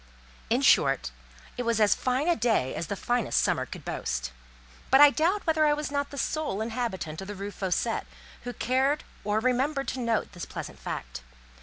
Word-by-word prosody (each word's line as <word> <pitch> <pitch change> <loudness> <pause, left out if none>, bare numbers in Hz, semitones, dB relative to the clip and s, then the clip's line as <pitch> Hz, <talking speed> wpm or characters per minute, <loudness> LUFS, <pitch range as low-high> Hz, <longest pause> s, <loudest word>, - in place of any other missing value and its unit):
In - - +2
short, 60 - +4 0.5
it - - -1
was 230 -2 +1
as 210 -1 +5
fine 260 +5 -1
a 345 - +4
day 220 - +1
as 170 - -4
the 200 - -3
finest 240 +1 0
summer - - +1
could - - -9
boast; 60 0 -3 0.6
but 270 - +6
I 290 0 +9
doubt 350 +8 +1
whether 315 -2 +3
I 295 - +4
was 300 -1 -4
not 285 0 -1
the 285 - -9
sole 305 -9 -1
inhabitant 220 -8 -3
of 190 - -7
the 205 - -6
Rue 200 +1 -5
Fossette, 195 +4 -1 0.3
who 245 - -5
cared 265 +6 +1 0.2
or 210 +1 +1
remembered 265 +4 0
to 255 - -4
note 230 -3 0
this 175 -3 -7
pleasant - - -7
fact. - - -6
240 Hz, 190 wpm, -28 LUFS, 200-285 Hz, 0.6 s, I